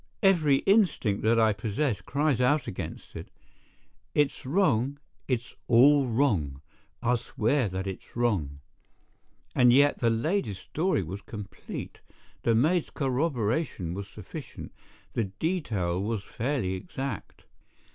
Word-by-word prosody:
Every 165 -8 +5
instinct 185 - +3
that 115 +1 +3
I 110 -1 +4
possess 110 +1 -1
cries 140 +4 0
out 140 +2 +3
against - - -7
it. - - -7 0.9
It's 145 -3 +1
wrong—it's 135 - -1
all 135 +3 +6
wrong—I'll 110 - -1
swear 120 0 0
that 95 +1 -4
it's 95 -1 -7
wrong. 90 -13 0 0.9
And 125 -1 +6
yet 140 +3 +4
the 120 - +3
lady's 115 - 0
story 160 - -1
was 95 +5 -6
complete, 105 -3 -8 0.4
the 115 - +2
maid's 155 +8 +2
corroboration 130 - -1
was 100 +1 -5
sufficient, 120 - -9 0.4
the 115 - 0
detail 100 - -1
was 105 0 -2
fairly 120 -6 -2
exact. 130 +8 -6
120 Hz, 115 wpm, -28 LUFS, 100-145 Hz, 0.9 s, all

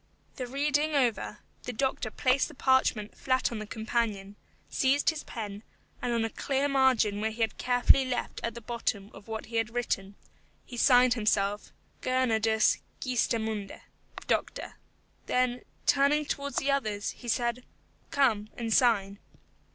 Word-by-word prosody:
The 255 -2 -4
reading 290 +3 0
over, 245 -5 0 0.2
the - - -5
doctor 260 -2 -1
placed 255 +4 +2
the 305 - -13
parchment 260 -6 +2
flat 260 -1 0
on 230 - -4
the 215 - -6
companion, 220 -3 -2 0.3
seized 280 +4 +2
his 310 -2 -7
pen, 205 -3 -6 0.4
and 245 - -1
on 230 -1 +1
a 225 - -4
clear 275 0 0
margin 255 -7 +3
which 220 0 -1
he 235 - -6
had 225 - 0
carefully 245 +2 +4
left 255 -2 -3
at 230 -1 -2
the 235 - -7
bottom 215 -3 -3
of 205 - -13
what 220 0 -5
he 230 0 -4
had 225 0 +1
written, 200 -5 -2 0.5
he 245 - -9
signed 250 0 +5
himself, 205 -2 0 0.3
GERNARDUS 225 -4 +2 0.2
GEESTEMUNDE: 220 -5 -1 0.5
Doctor. - - -1 0.5
Then, 250 0 +1 0.2
turning 290 +2 +3
towards 280 0 -3
the 275 - +1
others, 215 -7 -1
he 245 - -12
said, 240 +1 0 0.5
"Come, 220 -7 +2
and 230 -2 -1
sign." 205 -5 +3
240 Hz, 150 wpm, -29 LUFS, 215-260 Hz, 0.5 s, signed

